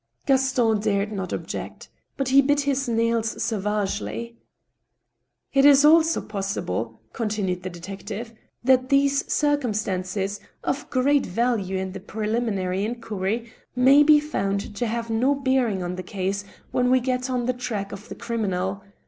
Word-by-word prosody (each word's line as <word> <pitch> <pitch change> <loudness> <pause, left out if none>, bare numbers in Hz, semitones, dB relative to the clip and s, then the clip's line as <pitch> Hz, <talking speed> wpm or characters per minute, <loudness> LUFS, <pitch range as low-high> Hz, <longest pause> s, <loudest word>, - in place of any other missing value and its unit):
Gaston 260 -5 +2
dared 205 0 0
not 190 -3 -4
object. - - -5 0.3
But 275 -1 -1
he 275 +1 +7
bit 290 +1 +2
his 275 -2 0
nails 230 -1 0
savagely. 195 - -2 0.6
" 120 0 -52
It 275 0 +4
is 285 0 +7
also 320 +1 +5
possible," 120 - -4
continued 205 -5 -2
the 185 - -5
detective, 195 +6 -7 0.2
" - - -48
that 255 0 +3
these 275 0 +2
cir 290 -1 +3
cumstances, 200 -5 -2 0.2
of 280 - -2
great 275 +2 +2
value 200 -2 0
in 190 0 -3
the 195 - -7
preliminary 210 -2 -2
inquiry, 225 0 -3 0.2
may 265 +3 +6
be 300 0 +7
found 200 -8 -2
to 240 - 0
have 230 0 -3
no 255 +6 +2
bearing 260 -8 +1
on 180 +1 -4
the - - -3
case 195 +2 -3 0.3
when 250 0 +2
we 255 0 +5
get 250 0 -1
on 250 -2 -1
the 255 - +1
track 220 -5 -4
of 200 +1 -9
the - - -6
criminal. 195 -4 -2
220 Hz, 155 wpm, -24 LUFS, 195-255 Hz, 0.6 s, he